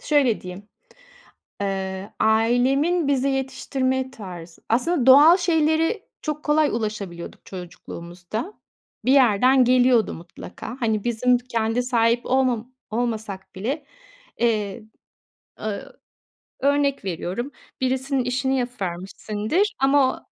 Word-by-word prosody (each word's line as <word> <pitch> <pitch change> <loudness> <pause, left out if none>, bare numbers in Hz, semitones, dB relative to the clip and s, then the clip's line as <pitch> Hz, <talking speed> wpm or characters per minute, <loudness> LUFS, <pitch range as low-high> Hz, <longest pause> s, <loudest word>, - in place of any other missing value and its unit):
şöyle 275 -7 +2
diyeyim. 185 +3 -9 0.9
Eee, 190 0 -3
ailemin 255 +9 +2
bize 275 -1 +2
yetiştirme 260 0 -1
tarzı. 180 -8 -10
Aslında 255 +4 +1
doğal 295 +7 +9
şeylere 325 +3 +1 0.2
çok 300 -1 -4
kolay 300 0 +3
ulaşabiliyorduk 210 -6 -5
çocukluğumuzda. 180 - -7 0.5
Bir 255 - +4
yerden 255 0 +5
geliyordu 250 -2 +4
mutlaka. 180 +7 -9
Hani 220 -3 0
bizim 245 +1 +2
d 240 - -16
kendi 225 +1 0
sahip 235 -1 +1
olmam 255 -2 +1 0.2
olmasak 220 -4 -3
bile, 265 +10 -3 0.5
eee, 215 -5 0 0.8
ııı, 215 -2 -5 0.6
örnek 280 -2 +1
veriyorum. 190 - -3 0.3
Birisinin 260 +1 0
işini 255 +2 0
yapıvermişsindir 215 - -2
ama 270 0 +3
o - - -13
245 Hz, 105 wpm, -23 LUFS, 210-270 Hz, 0.9 s, doğal